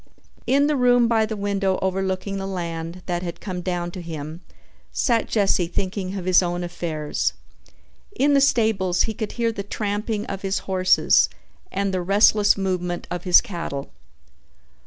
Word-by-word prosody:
In 280 +2 +4
the 300 0 +1
room 245 -2 +4
by 220 -2 +2
the 220 -1 -4
window 200 -1 0
overlooking 190 +1 -1
the 195 0 -4
land 170 -1 -5
that 175 -1 -2
had 175 -2 -6
come 185 -3 -5
down 175 -1 -2
to 180 - -7
him 160 0 -7 0.5
sat 235 -4 +1
Jesse 195 -5 +2
thinking 190 +1 -3
of 180 - -5
his 185 0 +5
own 175 0 -2
affairs. 160 -3 -2 0.8
In 285 -2 +3
the 280 - +5
stables 220 -9 +2
he 220 - -2
could 215 0 -5
hear 235 -1 0
the 210 - -5
tramping 205 +1 -3
of 195 -1 -5
his 195 0 -1
horses 185 -1 +4 0.4
and 195 0 -1
the 185 - 0
restless 205 +3 +4
movement 180 -2 -2
of 180 0 -4
his 180 - +7
cattle. 165 -7 -5
190 Hz, 160 wpm, -23 LUFS, 175-210 Hz, 0.8 s, his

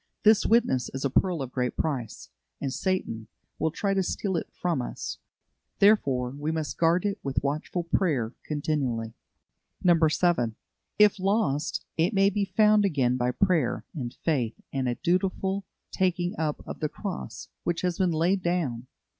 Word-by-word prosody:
This 215 -1 +5
witness 220 - +3
is 135 - -2
a 135 - 0
pearl 175 -1 +2
of 130 - -7
great 125 -1 -2
price, 130 -8 -3 0.3
and 135 -2 -2
Satan 130 - -2 0.3
will 160 - +2
try 195 +5 -1
to 195 - +2
steal 190 +1 -2
it 165 - -2
from 170 -7 -1
us; - - -5 0.6
therefore, 135 - +3
we 145 +3 -3
must 160 -2 -3
guard 170 +3 +3
it 200 -1 -1
with 135 -1 -2
watchful 150 +5 -2
prayer 145 - 0
continually. 135 -7 -2 0.7
7. 165 -7 +3 0.4
If 210 -1 +5
lost, 185 -7 0
it 175 +6 +2
may 195 +1 +4
be 200 +1 0
found 210 +2 +4
again 135 -10 +2
by 125 -1 +1
prayer 165 -2 +1
and 125 -8 -4
faith 125 -9 -1
and 130 -2 0
a 120 - -1
dutiful 190 +3 0 0.3
taking 180 -1 0
up 155 -2 -2
of - - -6
the 155 - -1
cross 195 +1 -6
which 170 -1 -1
has 180 -2 -1
been 185 -2 +3
laid 175 +4 +2
down. 150 -9 -1
165 Hz, 160 wpm, -27 LUFS, 135-190 Hz, 0.7 s, This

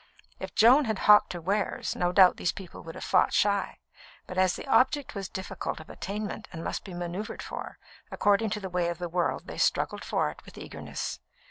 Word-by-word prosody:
If - - -7
Joan 255 +6 +6
had 220 -3 -1
hawked 210 0 +6
her 175 - -5
wares, 200 +4 -1
no 175 0 +1
doubt 185 0 +6
these 180 - 0
people 190 -4 -10
would 165 0 -9
have - - -7
fought 185 - +3
shy; 200 -1 +1 0.5
but 180 - -8
as 185 -1 +3
the - - -7
object 270 +1 +2
was 195 -3 -5
difficult 190 -4 -5
of 160 - -11
attainment 205 +1 -5
and 165 -2 -7
must - - -3
be 185 -3 -8
manoeuvred 175 +4 -5
for, - - -7 0.3
according 205 +2 +2
to 210 - -2
the 195 - -5
way 180 -1 0
of 170 - -3
the 175 0 -4
world 175 0 0
they - - -7
struggled - - +1
for 75 - 0
it - - -16
with - - -15
eagerness. - - -6
190 Hz, 210 wpm, -28 LUFS, 175-210 Hz, 0.5 s, Joan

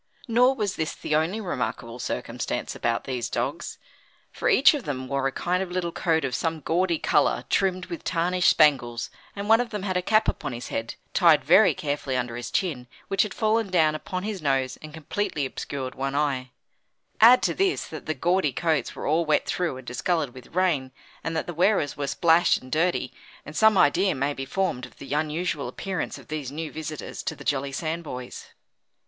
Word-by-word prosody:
Nor 250 +3 +4
was 205 -5 -2
this 160 -1 -2
the - - -4
only 165 +8 +1
remarkable 125 - -4
circumstance - - -3
about 115 0 -1
these 125 -3 -3
dogs, 135 +8 -3 0.5
for - - -1
each 320 - +6
of 290 -4 -3
them 130 -2 -4
wore 135 0 0
a - - -2
kind 180 +6 -1
of 190 - -3
little 180 -1 -2
coat 160 -3 +1
of 130 - -3
some 160 +2 -1
gaudy 170 +3 +1
colour 150 -1 +2
trimmed 185 -1 +1
with 170 - -7
tarnished 180 +1 +2
spangles, 120 -7 +3 0.2
and 200 0 -4
one 225 +2 +6
of 245 - -4
them 210 -3 -5
had 185 -2 -1
a - - +1
cap 215 +4 +3
upon 135 - -2
his 120 - -6
head, 115 +1 -3 0.2
tied 160 -6 +5
very 190 +7 +6
carefully 145 -6 -2
under 120 -2 -2
his 120 0 -5
chin, 145 -10 -1 0.2
which 195 0 +2
had 210 - 0
fallen 220 0 +1
down 160 -4 +3
upon 185 +4 -4
his 205 -3 -4
nose 135 -3 0
and 155 - -9
completely 160 0 -2
obscured 130 -1 -5
one 135 +1 -3
eye; 135 -3 0 0.7
add 240 +3 +8
to - - +2
this, 380 0 +1
that 155 - -9
the 155 - -1
gaudy 175 +1 +1
coats 155 -1 -1
were - - -6
all 160 +3 +2
wet 150 -2 +2
through 170 -7 -1
and 130 - -11
discoloured 140 +2 -1
with 130 +4 -14
rain, 160 -8 +1 0.3
and 165 0 -2
that - - -1
the 175 - -5
wearers 175 -3 +2
were 145 -1 -3
splashed 165 +3 +4
and 130 - -14
dirty, 165 -5 0 0.3
and 150 - -9
some 220 +1 +5
idea 185 +5 +4
may 140 +2 0
be 135 -1 -5
formed 170 -4 -1
of - - -22
the 140 - -6
unusual 150 -1 -1
appearance 185 +8 -4
of - - -14
these 150 -4 -4
new 155 +2 -5
visitors 155 -1 -6
to - - -3
the - - -11
Jolly 140 -1 -1
Sandboys. 155 -4 -5
160 Hz, 200 wpm, -25 LUFS, 135-185 Hz, 0.7 s, add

